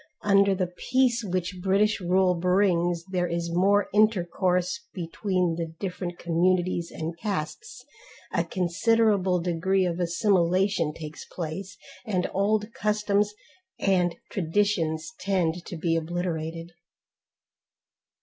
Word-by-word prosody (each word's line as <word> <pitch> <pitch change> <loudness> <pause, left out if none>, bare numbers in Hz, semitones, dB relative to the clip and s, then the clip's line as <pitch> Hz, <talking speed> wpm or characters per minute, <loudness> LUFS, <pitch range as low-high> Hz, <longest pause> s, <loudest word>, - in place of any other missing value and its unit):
Under 200 -1 +4
the 185 -1 0
peace 245 +1 +1
which 185 -1 -3
British 200 +3 +2
rule 185 +1 +3
brings 175 -1 +1
there 180 -1 0
is 170 0 -2
more 200 +3 +3
intercourse 185 -3 +2 0.2
between 180 -1 -1
the 165 -1 -4
different 180 -2 -4
communities 175 0 +1
and 160 +1 -5
castes, 210 - -4 0.5
a - - +2
considerable, 190 +1 +2
degree 180 +2 +1
of 175 0 -2
assimilation 180 -1 +2
takes 155 0 -8
place, 180 +3 -6 0.3
and 195 -6 -1
old 210 +3 +1
customs 210 0 0 0.4
and 180 -3 +2 0.2
traditions 165 -3 0
tend 180 -3 0
to 175 - -6
be 165 0 0
obliterated. 165 0 -3
180 Hz, 110 wpm, -26 LUFS, 170-200 Hz, 0.5 s, Under